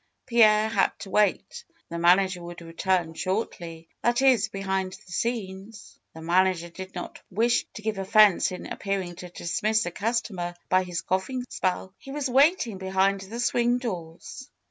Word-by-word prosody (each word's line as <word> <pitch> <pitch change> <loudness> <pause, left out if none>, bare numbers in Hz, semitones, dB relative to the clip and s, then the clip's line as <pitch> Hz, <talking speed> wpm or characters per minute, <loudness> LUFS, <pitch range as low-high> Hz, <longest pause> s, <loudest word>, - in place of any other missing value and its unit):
Pierre 220 -3 +5
had - - +1
to 195 - -8
wait. 210 -1 +1 0.3
The 170 - -4
manager 180 +1 +4
would 170 0 -9
return 170 0 -1
shortly. 170 -2 -4
That 240 +2 +2
is, 245 -6 +4
behind 190 -2 -2
the 185 - -14
scenes, 210 0 -4 0.2
the 160 - -9
man 180 +3 +4
ager 170 -2 -3
did 190 +2 -9
not - - -7
wish 230 +5 +1
to 215 - -8
give 215 -2 -2
offense 205 -1 +5
in 180 - -7
appearing 190 -3 -3
to 180 0 -8
dis 170 +1 -4
miss 220 +1 +2
a 175 - -3
customer 195 -4 -2
by 185 0 +3
his 175 -2 -3
coughing 190 +9 -2
spell. 185 0 -2
He - - -13
was 280 -2 -2
wait 290 +7 +4
ing 210 -5 -7
behind 190 +1 +1
the 210 +5 -7
swing 240 0 +2
doors. 185 - -7
190 Hz, 170 wpm, -26 LUFS, 180-225 Hz, 0.3 s, Pierre